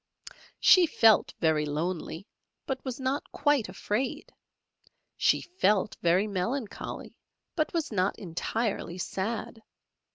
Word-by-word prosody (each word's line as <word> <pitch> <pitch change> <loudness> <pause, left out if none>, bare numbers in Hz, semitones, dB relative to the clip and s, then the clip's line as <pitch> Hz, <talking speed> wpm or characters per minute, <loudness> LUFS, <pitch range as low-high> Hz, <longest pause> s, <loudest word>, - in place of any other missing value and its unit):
She 365 -3 +7
felt 225 -8 +4
very 160 -2 +2
lonely, 165 +3 -3 0.4
but 265 -1 -3
was 260 -2 -5
not 265 +2 -2
quite 290 -9 +1
afraid; 210 +7 -3 0.8
she - - +3
felt 215 - +1
very 175 +4 +3
melancholy, 215 +4 -4 0.4
but 310 -2 0
was 330 -6 -2
not 190 -1 0
entirely 195 +1 -3
sad. 215 +5 -4
215 Hz, 105 wpm, -28 LUFS, 185-265 Hz, 0.8 s, She